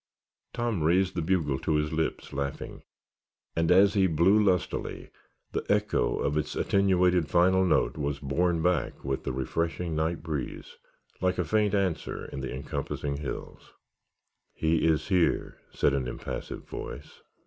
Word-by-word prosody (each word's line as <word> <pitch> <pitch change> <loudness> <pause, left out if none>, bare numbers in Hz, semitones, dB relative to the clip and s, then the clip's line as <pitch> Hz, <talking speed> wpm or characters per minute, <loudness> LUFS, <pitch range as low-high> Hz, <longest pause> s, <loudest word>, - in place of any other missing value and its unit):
Tom 120 -7 -1
raised 90 +4 +3
the 85 - -2
bugle 80 -5 0
to 80 - 0
his 75 +1 0
lips 80 0 -2
laughing, 70 0 -4 0.7
and 80 0 +1
as 95 +3 +6
he 95 -2 +4
blew 95 +6 +4
lustily 90 -4 -1 0.4
the - - -2
echo 105 0 +1
of 75 +2 0
its 75 - -2
attenuated 90 -4 +3
final 95 +2 +4
note 90 -3 +2
was 70 -1 -1
borne 80 +4 0
back 90 -1 0
with 70 -1 -3
the 65 +1 -2
freshening 85 +1 -2
night 80 +2 -1
breeze, 75 -4 -5 0.4
like 90 0 +1
a 90 - 0
faint 105 +4 +2
answer 95 -5 -1
from 70 - -5
the 65 - -4
encompassing 70 +1 -3
hills. 75 -1 -7 0.8
"He 80 0 +2
is 80 +2 +1
here," 90 -4 +1
said - - +2
an 65 -3 -1
impassive - - -6
voice. - - -8
85 Hz, 150 wpm, -28 LUFS, 75-95 Hz, 0.8 s, as